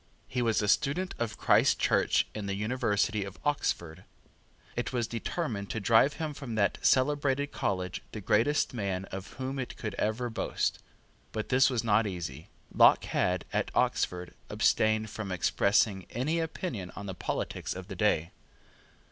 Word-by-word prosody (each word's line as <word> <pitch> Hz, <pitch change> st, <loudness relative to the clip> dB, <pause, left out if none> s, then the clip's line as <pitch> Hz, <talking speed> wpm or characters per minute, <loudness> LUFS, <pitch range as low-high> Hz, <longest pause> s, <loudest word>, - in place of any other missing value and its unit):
He 125 Hz, -, -2 dB
was 115 Hz, -2 st, +2 dB
a -, -, 0 dB
student 150 Hz, -, +1 dB
of 115 Hz, -3 st, -2 dB
Christ -, -, +4 dB
Church -, -, +2 dB
in 105 Hz, -2 st, -5 dB
the 100 Hz, -, -1 dB
University 105 Hz, -1 st, 0 dB
of 95 Hz, 0 st, -8 dB
Oxford. 90 Hz, -, -1 dB, 0.7 s
It 120 Hz, -, -2 dB
was 120 Hz, -3 st, 0 dB
determined 115 Hz, -, -3 dB
to 110 Hz, -, -2 dB
drive 115 Hz, +7 st, +4 dB
from 145 Hz, -7 st, -5 dB
that 100 Hz, -3 st, +1 dB
celebrated 140 Hz, +1 st, +2 dB
college 90 Hz, -2 st, -2 dB
the 110 Hz, -, -6 dB
greatest 115 Hz, +10 st, +2 dB
man 100 Hz, -5 st, -2 dB
of 95 Hz, +1 st, -7 dB
whom 135 Hz, +1 st, -4 dB
it 130 Hz, -, -5 dB
could 110 Hz, -, -4 dB
ever 115 Hz, +3 st, -1 dB
boast. 110 Hz, -, -1 dB, 0.5 s
But 110 Hz, -, -4 dB
this 130 Hz, +1 st, +5 dB
was 120 Hz, -4 st, -1 dB
not 110 Hz, 0 st, +3 dB
easy. 80 Hz, -6 st, -6 dB, 0.2 s
Locke -, -, +6 dB
had, 90 Hz, -1 st, 0 dB
at -, -, 0 dB
Oxford, 90 Hz, -1 st, 0 dB, 0.2 s
abstained 110 Hz, 0 st, +2 dB
from 105 Hz, -4 st, -5 dB
expressing 100 Hz, +1 st, +2 dB
any 150 Hz, +8 st, -1 dB
opinion 145 Hz, -, -4 dB
on 100 Hz, -, -7 dB
the 95 Hz, -, -4 dB
politics -, -, -3 dB
of -, -, -7 dB
the -, -, -7 dB
day. 85 Hz, +3 st, +1 dB
110 Hz, 155 wpm, -30 LUFS, 100-130 Hz, 0.7 s, Locke